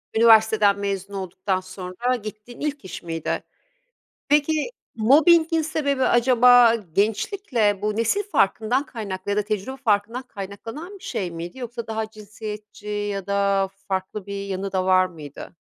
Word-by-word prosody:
Üniversiteden 220 -3 +5
mezun 200 0 -3
olduktan 185 0 -2
sonra 185 +6 -3
gittiğin 215 +1 -9
ilk 290 -6 -3
iş 185 - -7
miydi? 165 -2 -3 0.8
Peki, 300 +4 +2 0.3
mobbing'in 320 +7 +5
sebebi 285 -4 0
acaba 245 -1 +6
gençlikle 215 - 0
bu 210 0 -1
nesil 230 - +1
farkından 245 - +1
kaynaklı 200 -5 -5
ya 205 - 0
da - - +4
tecrübe 215 +5 -3
farkından 230 +1 0
kaynaklanan 225 - -8
bir - - -19
şey 180 -3 -3
miydi 170 +7 -7
yoksa 240 -2 -6
daha 220 -1 -3
cinsiyetçi 210 0 -9
ya 205 -2 -3
da 200 -1 +1 0.2
farklı 190 +1 -3
bir 200 0 -5
yanı 195 0 -4
da 185 -1 0
var 185 0 +5
mıydı? 155 -2 -10
210 Hz, 140 wpm, -23 LUFS, 195-245 Hz, 0.8 s, acaba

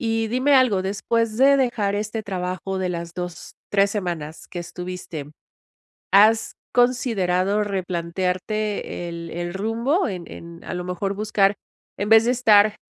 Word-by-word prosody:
Y 225 -2 0
dime 260 +4 +2
algo, 245 -8 +4
después 215 +3 -1
de 275 +1 +6
dejar 225 -6 0
este 215 +1 -3
trabajo 185 0 -3
de 185 - -1
las 170 -1 -5
2, 180 -1 -6
3 200 0 +3
semanas 170 -6 -4
que 175 - -6
estuviste, 175 -4 -7 0.8
¿has 215 +3 +5 0.2
considerado 210 -6 +2
replantearte 185 +1 -2
el 170 -1 -7
el 175 +1 -4
rumbo, 230 - 0
en 180 -4 -5
en, 170 0 -11
a - - -5
lo 180 - -4
mejor, 180 +2 -2
buscar 205 -1 +2 0.4
en 205 +2 -2
vez 225 +1 +7
de 245 - +3
estar 215 -4 +5
200 Hz, 145 wpm, -23 LUFS, 180-225 Hz, 0.8 s, vez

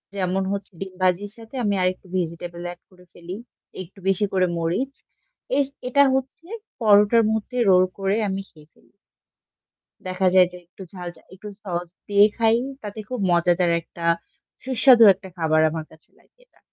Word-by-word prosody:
যেমন 190 0 -1
হচ্ছে 200 0 -6
ডিম 195 -1 -6
ভাজির 185 +3 +1
সাথে 225 +3 -13
আমি 205 -1 +1
আরেকটু 185 +1 -1
ভেজিটেবল 170 0 -4
এড 175 - -13
করে 180 -1 -20
ফেলি, 175 +2 -8 0.5
একটু 185 +2 -13
বেশি 195 +2 +2
করে 185 -1 +3
মরিচ। 175 +12 -1 0.7
এস 285 - +3 0.2
এটা 280 +3 +4
হচ্ছে 265 +5 -4 0.4
পরোটার 210 +2 +5
মধ্যে 220 +3 -3
রোল 185 0 +6 0.2
করে 195 +1 0
আমি 195 0 -3
খেয়ে 150 -2 -19
ফেলি। - - -28 1.2
দেখা 185 +1 0
যায় 185 -1 +6
যে 180 - -10
একটু 185 +2 -13
ঝাল 180 -2 -8
যা - - -20
একটু 210 +3 -10
sauce 175 -3 -4 0.2
দিয়ে 205 0 +6
খাই, 225 0 +3 0.3
তাতে 210 +1 -7
খুব 250 -2 -4
মজাদার 175 0 +2
একটা 170 +1 -9 0.6
সুস্বাদু 255 -2 +5
একটা 190 +1 -13
খাবার 155 -1 +2
আমার 160 0 -5
কাছে 160 - -21
লাগে - - -32
এটা। - - -32
190 Hz, 165 wpm, -23 LUFS, 175-210 Hz, 1.2 s, রোল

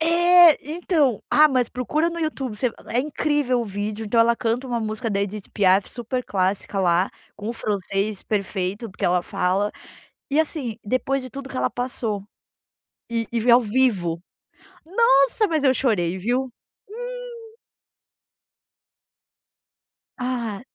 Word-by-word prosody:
É 345 0 +6
então, 305 - 0
ah, 305 +1 +6
mas 255 -3 +1
procura 305 +7 -1
no 340 - -6
YouTube 270 -8 -3
você 245 +2 0 0.2
é 240 - 0
incrível 290 -3 0
o - - -2
vídeo 205 +2 -4
então 230 +2 +2
ela 235 0 +4
canta 240 +3 -1
um 240 -2 -2
música 215 +1 -3
da 200 0 0
Edit 205 0 -5
Piaf 195 -1 +3
super 250 +1 -4
clássica 195 +1 -1
lá, 180 +1 +2 0.3
com 210 +2 -6
o - - -1
francês 200 -1 -2
perfeito 200 +1 -3
porque - - -6
ela 180 0 +2
fala, 190 +4 0 0.6
e 290 - +1
assim 275 -8 -3
depois 255 +4 0
de 255 - -8
tudo 275 -1 -8
que - - -8
ela 125 0 0
passou, 240 -5 -3 0.9
e 230 -1 -1
e 235 - 0
vê 240 - +3
ao 245 - +7
vivo. 205 -8 +1 0.7
Nossa 375 - +3
mas 315 -5 0
eu 265 -1 +5
chorei 190 -10 0
viu? 240 +7 0 1.0
Hum. 450 -1 -14 2.6
Ah, 245 -5 -3
235 Hz, 145 wpm, -23 LUFS, 205-270 Hz, 2.6 s, ao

